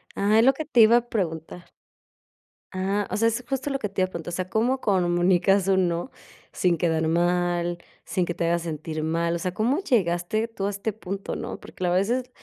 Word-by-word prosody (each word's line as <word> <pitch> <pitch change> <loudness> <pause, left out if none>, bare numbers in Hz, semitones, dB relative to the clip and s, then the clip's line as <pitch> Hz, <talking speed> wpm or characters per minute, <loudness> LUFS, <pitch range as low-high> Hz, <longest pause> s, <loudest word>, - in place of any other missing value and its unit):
Ajá, 210 +2 +3
es 230 - +5
lo 270 - +6
que 310 +3 -5
te 270 -5 +1
iba 225 +2 +7
a 240 0 -2
preguntar. 175 -3 -4 1.1
Ah, 195 +2 -1
o - - -2
sea, 230 +2 +3
es 235 +2 -4
justo 270 +2 -2
lo 275 -1 -2
que 215 - -2
te 195 -1 -3
iba 185 - +3
a - - -17
preguntar, 170 -1 -6
o - - -1
sea, 185 0 -3
¿cómo 245 +6 +1
comunicas 185 0 +2
un 190 -1 +3
no, 170 +8 -3 0.4
sin 175 -2 +1
quedar 160 -1 +1
mal, 175 +1 +1 0.3
sin 180 - -1
que 175 - -3
te 170 - -2
haga 170 +1 +2
sentir 155 -1 -5
mal, 170 +1 0
o - - -3
sea, 185 0 -3
cómo 240 - +1
llegaste 215 - 0
tú 205 -4 -4
a - - 0
este 205 +2 -3
punto, 195 -2 -5
¿no? - - -6
Porque, 185 - -6
a - - +1
veces, 235 +8 0
185 Hz, 220 wpm, -25 LUFS, 175-220 Hz, 1.1 s, iba